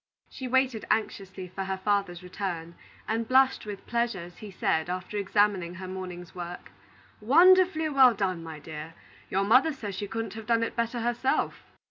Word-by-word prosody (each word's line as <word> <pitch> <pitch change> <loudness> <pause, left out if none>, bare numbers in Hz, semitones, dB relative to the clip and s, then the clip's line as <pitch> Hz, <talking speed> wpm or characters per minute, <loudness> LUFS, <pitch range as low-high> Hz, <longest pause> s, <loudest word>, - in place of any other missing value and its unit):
She 260 - -6
waited 260 -3 +1
anxiously 195 -3 -2
for 195 +2 -5
her 190 0 -2
father's 190 -2 -1
return, 175 -2 -5 0.3
and 225 +1 -1
blushed 260 -2 +3
with 205 -2 -7
pleasure 235 -5 -1
as 175 0 -13
he 215 - -8
said, 165 -3 0
after 185 +3 -4
examining 200 -3 +1
her 185 0 -7
morning's 180 -2 -7
work: 175 -1 -7 0.5
"Wonderfully 340 - +5
well 265 -5 +6
done, 185 -4 -1
my 160 -1 -7
dear! 155 +1 -8 0.3
Your 195 +1 +1
mother 255 +10 +5
says 220 -9 -6
she 205 +2 -4
couldn't 225 +2 -4
have 220 -1 -9
done 230 -1 +3
it 230 - -3
better 235 0 -1
herself." 240 +3 0
205 Hz, 170 wpm, -28 LUFS, 185-235 Hz, 0.5 s, well